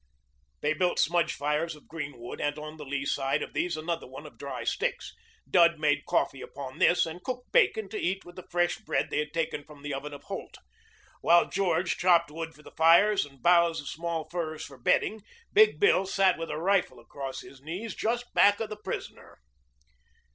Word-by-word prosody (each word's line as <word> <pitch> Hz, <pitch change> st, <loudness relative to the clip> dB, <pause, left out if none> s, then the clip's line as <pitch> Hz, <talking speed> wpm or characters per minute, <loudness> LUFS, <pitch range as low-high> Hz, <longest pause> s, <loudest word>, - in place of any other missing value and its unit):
They 150 Hz, +1 st, +2 dB
built 175 Hz, +2 st, 0 dB
smudge 170 Hz, 0 st, +2 dB
fires 150 Hz, +3 st, -1 dB
of 150 Hz, -, -18 dB
green 150 Hz, -5 st, -6 dB
wood 120 Hz, +1 st, -7 dB
and 145 Hz, +1 st, -1 dB
on 155 Hz, +1 st, -8 dB
the 150 Hz, -, -8 dB
lee 140 Hz, 0 st, -3 dB
side 135 Hz, -1 st, 0 dB
of -, -, -8 dB
these 175 Hz, -2 st, -1 dB
another 165 Hz, +2 st, -3 dB
one -, -, -10 dB
of -, -, -13 dB
dry -, -, -5 dB
sticks. -, -, -2 dB, 0.3 s
Dud 170 Hz, -2 st, +5 dB
made 150 Hz, -1 st, +1 dB
coffee 135 Hz, -, 0 dB
upon 135 Hz, -2 st, -8 dB
this 175 Hz, -, +4 dB
and 165 Hz, +2 st, -8 dB
cooked 250 Hz, -1 st, -5 dB
bacon 220 Hz, -, +3 dB
to 215 Hz, -, -4 dB
eat 190 Hz, +2 st, -1 dB
with 175 Hz, -, -13 dB
the 185 Hz, -, -10 dB
fresh 175 Hz, 0 st, +1 dB
bread 220 Hz, -, -1 dB
they -, -, 0 dB
had 150 Hz, 0 st, -2 dB
taken 160 Hz, -3 st, -2 dB
from 145 Hz, -1 st, -15 dB
the 145 Hz, -1 st, -3 dB
oven 145 Hz, +2 st, -5 dB
of 145 Hz, -, -10 dB
Holt. -, -, -7 dB, 0.6 s
While 170 Hz, 0 st, +5 dB
George 185 Hz, -2 st, +1 dB
chopped 170 Hz, -3 st, +4 dB
wood 165 Hz, +1 st, -6 dB
for 150 Hz, -, -18 dB
the -, -, -13 dB
fires 170 Hz, +3 st, +5 dB
and 135 Hz, -3 st, -21 dB
boughs 170 Hz, -1 st, +4 dB
of 145 Hz, -, -8 dB
small 165 Hz, 0 st, -3 dB
firs 160 Hz, -3 st, -3 dB
for 135 Hz, -2 st, -13 dB
bedding, 215 Hz, -, +1 dB, 0.3 s
Big 430 Hz, +1 st, +5 dB
Bill 195 Hz, -, +4 dB
sat 195 Hz, -1 st, +3 dB
with 165 Hz, -, -4 dB
a -, -, -3 dB
rifle 190 Hz, +3 st, +1 dB
across 135 Hz, -2 st, -7 dB
his 135 Hz, -, -14 dB
knees 180 Hz, +10 st, -5 dB
just 240 Hz, +2 st, -2 dB
back 205 Hz, 0 st, +5 dB
of 225 Hz, -1 st, -4 dB
the 215 Hz, -, -5 dB
prisoner. -, -, -6 dB
165 Hz, 205 wpm, -28 LUFS, 150-185 Hz, 0.6 s, Dud